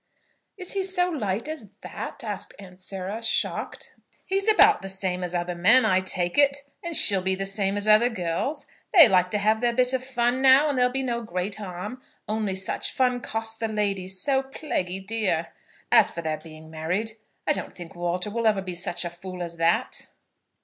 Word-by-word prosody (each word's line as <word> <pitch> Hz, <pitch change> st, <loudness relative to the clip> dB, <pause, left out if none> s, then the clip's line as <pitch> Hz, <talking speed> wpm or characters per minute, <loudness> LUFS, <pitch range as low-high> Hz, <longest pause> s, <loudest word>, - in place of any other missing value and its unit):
"Is 365 Hz, -2 st, +1 dB
he 390 Hz, -1 st, -1 dB
so 360 Hz, -1 st, +2 dB
light 215 Hz, -, -2 dB
as 310 Hz, -10 st, -7 dB
that?" -, -, -7 dB
asked -, -, -5 dB
Aunt 185 Hz, -2 st, -14 dB
Sarah, 195 Hz, +3 st, -5 dB
shocked. 225 Hz, -, -2 dB, 0.3 s
"He's 390 Hz, +2 st, 0 dB
about 425 Hz, -1 st, +5 dB
the 195 Hz, -, -6 dB
same 190 Hz, -1 st, -1 dB
as 180 Hz, 0 st, -3 dB
other 175 Hz, 0 st, -2 dB
men, 220 Hz, +9 st, +4 dB
I 185 Hz, 0 st, +3 dB
take 185 Hz, +3 st, 0 dB
it; 280 Hz, 0 st, +3 dB, 0.2 s
and 340 Hz, -1 st, -3 dB
she'll 195 Hz, -8 st, +8 dB
be 190 Hz, +1 st, +1 dB
the 195 Hz, +1 st, -4 dB
same 195 Hz, 0 st, 0 dB
as 205 Hz, +1 st, -2 dB
other 215 Hz, +3 st, +5 dB
girls. 225 Hz, -, -3 dB, 0.3 s
They 330 Hz, -7 st, +10 dB
like 185 Hz, -3 st, +3 dB
to 210 Hz, -, 0 dB
have 215 Hz, +2 st, +1 dB
their 240 Hz, -1 st, +1 dB
bit 250 Hz, +1 st, +1 dB
of 260 Hz, -1 st, -1 dB
fun 250 Hz, -1 st, -1 dB
now, 270 Hz, +3 st, +6 dB
and 285 Hz, -, -1 dB
there'd 250 Hz, -1 st, +2 dB
be 270 Hz, +1 st, -2 dB
no 235 Hz, -2 st, -2 dB
great 190 Hz, -2 st, -4 dB
harm, 210 Hz, +5 st, -7 dB, 0.3 s
only 215 Hz, -3 st, -2 dB
such 190 Hz, 0 st, -2 dB
fun 250 Hz, -1 st, +1 dB
costs 225 Hz, 0 st, -4 dB
the 225 Hz, -, -1 dB
lady 200 Hz, -3 st, -1 dB
so 230 Hz, +9 st, 0 dB
plaguy 265 Hz, -, -4 dB
dear. 190 Hz, -5 st, -2 dB, 0.4 s
As -, -, +6 dB
for 170 Hz, -, -7 dB
their 155 Hz, -1 st, -2 dB
being 160 Hz, 0 st, -13 dB
married, 180 Hz, +8 st, -2 dB, 0.3 s
I -, -, +2 dB
don't 190 Hz, -, -5 dB
think 175 Hz, -2 st, -10 dB
Walter 175 Hz, +3 st, -3 dB
will 230 Hz, +1 st, 0 dB
ever 205 Hz, -3 st, +1 dB
be 185 Hz, -1 st, -5 dB
such 175 Hz, 0 st, 0 dB
a -, -, -2 dB
fool 180 Hz, +1 st, -8 dB
as 170 Hz, -1 st, -7 dB
that." 165 Hz, +1 st, 0 dB
205 Hz, 200 wpm, -25 LUFS, 180-250 Hz, 0.4 s, They